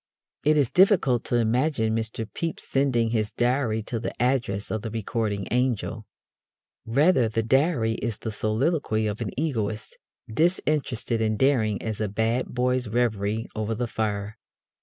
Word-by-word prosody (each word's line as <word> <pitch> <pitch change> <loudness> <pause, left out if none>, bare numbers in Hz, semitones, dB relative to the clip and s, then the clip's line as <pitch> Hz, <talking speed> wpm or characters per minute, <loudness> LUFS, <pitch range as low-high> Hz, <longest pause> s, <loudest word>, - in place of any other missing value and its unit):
It 155 +1 +4
is 140 -5 +2
difficult 180 - +4
to - - 0
imagine 120 0 +1
Mr. 115 0 -2
Pepys 165 -2 -3
sending 125 -5 +1
his 110 -2 0
Diary 120 -3 0
to 115 +1 -3
the 115 - -3
address 120 -5 0
of 110 - -1
the 110 - -4
Recording 110 -2 -2
Angel. 120 -3 -1 0.8
Rather, 135 0 +3
the 115 +1 -1
Diary 130 -1 +2
is 115 -4 -2
the 110 - -5
soliloquy 110 +2 0
of 105 +2 -3
an 110 - -2
egoist, 110 -8 -3 0.3
disinterested 135 -5 0
and 110 -1 +1
daring 110 -6 +2
as 110 -1 -3
a 110 - +1
bad 110 +5 0
boy's 125 0 0
reverie 110 -1 0
over 110 +1 -2
the 120 +2 -1
fire. 110 -1 -3
115 Hz, 150 wpm, -25 LUFS, 110-130 Hz, 0.8 s, It